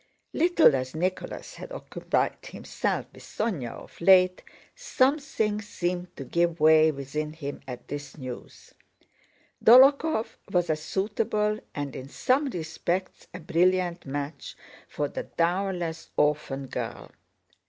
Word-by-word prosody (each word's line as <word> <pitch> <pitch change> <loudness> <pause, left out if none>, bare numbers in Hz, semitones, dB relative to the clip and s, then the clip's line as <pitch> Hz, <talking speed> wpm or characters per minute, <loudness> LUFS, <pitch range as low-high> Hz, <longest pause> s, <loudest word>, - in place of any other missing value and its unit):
Little 340 - +5
as 130 +2 -3
Nicholas 185 +3 -3
had - - -10
occupied - - -2
himself - - -3
with - - -14
Sónya 185 - -3
of - - -13
late, 185 0 +5 0.3
something 275 - 0
seemed 180 -3 -4
to 135 - -5
give 170 +4 0
way 155 0 +6
within 150 +2 -4
him 145 -3 -6
at 125 -2 -8
this 145 0 -7
news. 130 -3 -9 0.9
Dólokhov 265 +1 +6
was 175 -2 +2
a - - +2
suitable 210 +5 -1 0.2
and 145 -2 -4
in 130 +1 -7
some 270 - +1
respects 175 -1 -3
a 180 - -8
brilliant 175 0 +1
match 140 +1 -5 0.3
for 145 - -2
the - - -6
dowerless, 175 -1 -1
orphan 150 -2 +1
girl. - - -6
175 Hz, 120 wpm, -27 LUFS, 150-210 Hz, 0.9 s, way